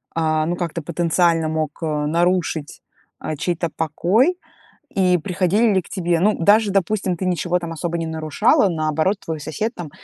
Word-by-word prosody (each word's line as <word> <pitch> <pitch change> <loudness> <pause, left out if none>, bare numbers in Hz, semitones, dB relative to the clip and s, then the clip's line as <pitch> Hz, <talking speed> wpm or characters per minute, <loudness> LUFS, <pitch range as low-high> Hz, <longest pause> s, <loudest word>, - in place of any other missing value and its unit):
а, 155 -1 +1
ну, 175 +2 -1
как-то 170 -1 -4
потенциально 170 0 +1
мог 155 0 -3
нарушить, 160 +1 -1 0.4
э, 155 - -3
чей-то 170 +1 -1
покой? 195 - +1 0.6
И 185 -2 +3
приходили 190 +5 +1
ли 190 - +2
к - - -18
тебе? 175 -3 0
Ну 210 +5 +3
даже, 205 +4 +4
допустим, 195 -1 0
ты 185 - -3
ничего 180 0 0
там 170 -1 -6
особо 170 +1 -3
не 165 - -3
нарушала, 160 - +2
наоборот, 155 +3 0
твой 160 -1 -4
сосед 210 - -3
там 170 -4 -7
170 Hz, 160 wpm, -21 LUFS, 160-190 Hz, 0.6 s, даже